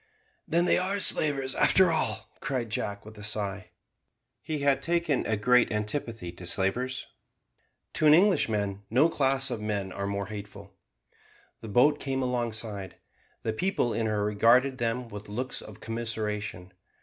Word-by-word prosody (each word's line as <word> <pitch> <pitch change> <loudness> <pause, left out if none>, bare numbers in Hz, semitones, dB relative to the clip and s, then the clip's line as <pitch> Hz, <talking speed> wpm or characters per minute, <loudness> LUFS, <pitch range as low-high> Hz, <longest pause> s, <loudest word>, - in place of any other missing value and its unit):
"Then 170 +2 +2
they - - +4
are 195 +2 0
slavers, 140 -7 +4
after 185 -3 +4
all," 160 - -1
cried 125 -6 -3
Jack, 100 -1 -3
with 110 0 -12
a - - -9
sigh. 100 -2 -3 0.7
He 155 -2 -4
had 140 -1 +2
taken 170 -3 0
a 110 - 0
great 125 +3 +3
antipathy 105 -3 -3
to 90 0 -9
slavers. 120 +9 0 0.9
To 155 - +2
an 150 - +8
Englishman 110 - +2
no 130 +9 +4
class 135 -3 +1
of 115 -3 -4
men 100 -3 -3
are 100 +2 -4
more 100 0 -2
hateful. 100 -1 -9 0.9
The 110 - -9
boat 145 +8 +4
came 135 -1 -2
alongside. 110 -6 -3 0.5
The 110 - -1
people 185 - 0
in 115 -1 -1
her 105 -1 0
regarded 120 +6 +3
them 120 +1 -1
with 105 -1 -9
looks 125 +5 -3
of - - -12
commiseration. 105 -5 -4
115 Hz, 150 wpm, -28 LUFS, 105-135 Hz, 0.9 s, an